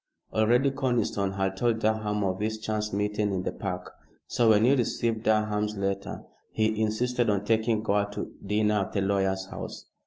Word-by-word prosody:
Already 120 +5 +3
Conniston 120 -7 0
had 95 -1 -1
told 115 +2 +1
Durham 110 -1 0
of 95 -1 -1
his 110 +1 -1
chance 110 -1 -2
meeting 105 +1 0
in 95 -1 -1
the - - -2
Park, 90 -2 -5 0.3
so 120 -2 +2
when 110 0 +5
he 130 - +5
received 115 -3 0
Durham's 105 -1 +1
letter 100 0 -3 0.3
he 110 0 +1
insisted 120 +2 +1
on 100 -1 0
taking 110 0 +1
Gore 105 -1 +1
to - - -5
dinner 105 +1 +2
at 95 - -3
the 100 - +1
lawyer's 95 -1 +1
house. - - -7
105 Hz, 175 wpm, -27 LUFS, 100-110 Hz, 0.3 s, when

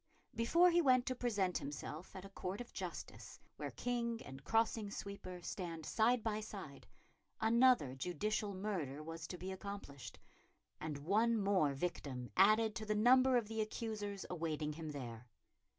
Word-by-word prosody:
Before 335 +11 +5
he 345 0 +5
went 255 -4 +5
to 255 - -1
present 205 -7 0
himself 150 +4 -6
at 190 0 -7
a - - -9
court 195 0 -4
of 245 - -8
justice - - -6 0.2
where - - -3
king 235 -2 -2
and 135 0 -9
crossing 225 +2 +1
sweeper 200 -3 -7
stand 165 -5 -5
side 230 +1 +3
by 215 -2 0
side, 195 -10 -8 0.5
another 230 - +5
judicial 195 +8 -1
murder 170 -8 -3
was 165 0 -6
to 180 - -6
be 185 +2 -5
accomplished, 190 -8 -7 0.6
and 155 -2 -3
one 215 +10 +2
more 195 -9 +2
victim 135 -5 -3
added 215 +3 +5
to 215 - -5
the 210 - +1
number 255 +4 +6
of 230 -3 0
the 220 0 -2
accusers 215 -3 -3
awaiting 155 -3 -2
him 160 0 -6
there. 120 -5 -6
200 Hz, 155 wpm, -37 LUFS, 160-225 Hz, 0.6 s, number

